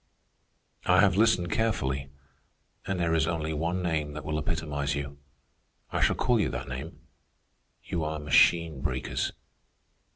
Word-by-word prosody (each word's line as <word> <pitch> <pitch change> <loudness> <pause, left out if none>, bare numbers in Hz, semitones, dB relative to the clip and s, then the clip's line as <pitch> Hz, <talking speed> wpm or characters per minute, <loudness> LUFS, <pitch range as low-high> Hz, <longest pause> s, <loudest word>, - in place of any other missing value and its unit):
"I 90 0 +5
have 95 -3 +4
listened 100 -5 +3
carefully, 70 -12 0 0.8
and 95 -2 -1
there 85 -1 +1
is 80 -1 +2
only 80 -2 -1
one 85 +4 -1
name 80 -3 -1
that 75 -1 -7
will 75 0 -1
epitomize 75 -2 -2
you. 70 0 -5 0.7
I - - -1
shall - - +3
call 125 -3 +2
you 105 - +1
that - - -5
name. 70 +5 -7 0.8
You 85 - -2
are 75 0 -2
machine 75 0 +3
breakers. 65 -3 -2
80 Hz, 140 wpm, -28 LUFS, 70-85 Hz, 0.8 s, I